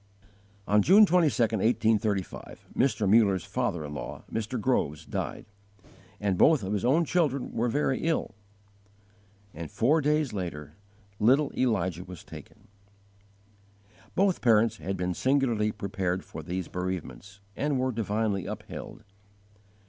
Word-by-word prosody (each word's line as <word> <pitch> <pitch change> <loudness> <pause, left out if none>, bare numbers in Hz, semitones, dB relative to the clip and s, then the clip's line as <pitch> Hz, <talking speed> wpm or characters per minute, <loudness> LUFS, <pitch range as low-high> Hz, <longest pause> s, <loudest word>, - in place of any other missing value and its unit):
On 105 +1 +4
June 200 - +7
22, 175 -7 +2
1835, 110 -2 0
Mr. 120 -5 +1
Muller's 100 -4 +4
father 80 -3 -2
in 75 - -7
law, 70 - -7
Mr. 115 +3 -2
Groves, 80 - 0
died; - - -4 0.7
and 100 -3 -1
both 155 -7 +5
of 95 +2 -2
his 105 - -1
own 150 +8 +3
children 145 -6 0
were 120 +2 0
very 135 0 0
ill, 160 -7 -1 1.2
and 80 -1 -7
four 150 +8 +2
days 150 -3 +1
later 75 -6 -5 0.5
little 135 +7 +3
Elijah 95 -8 0
was 90 -2 -11
taken. - - -13 1.5
Both 195 -2 +2
parents 115 -1 +3
had 95 -1 -4
been 90 0 -1
singularly 120 -4 +1
prepared 95 -3 -3
for - - -8
these 90 +2 -4
bereavements, 95 +2 -5 0.2
and 145 -1 0
were 130 0 0
divinely 105 -3 -1
upheld. - - -8
110 Hz, 125 wpm, -28 LUFS, 95-130 Hz, 1.5 s, June